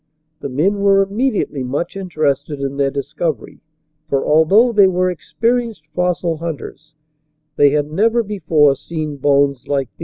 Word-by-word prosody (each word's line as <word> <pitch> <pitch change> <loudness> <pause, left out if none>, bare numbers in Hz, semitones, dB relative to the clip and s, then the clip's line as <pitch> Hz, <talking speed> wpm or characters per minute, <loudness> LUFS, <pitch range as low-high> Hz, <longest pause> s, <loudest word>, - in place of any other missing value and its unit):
The 140 - -5
men 180 +10 0
were 195 0 +4
immediately 205 - -1
much 140 +8 -3
interested 155 -6 -2
in 140 0 -4
their 140 -1 +1
dis 140 0 -6
covery, 160 -8 -3 0.5
for, 140 -1 0
although 190 +11 +4
they 205 -3 +5
were 185 0 +1
experienced 230 +1 -2
fossil 180 -1 -1
hunters, 155 -1 -7 0.6
they 145 - +5
had 145 +1 -1
never 230 +7 +2
before 160 -9 +2
seen 155 0 -5
bones 140 -1 +1
like 135 -3 -1
these. - - -43
160 Hz, 150 wpm, -18 LUFS, 140-195 Hz, 0.6 s, they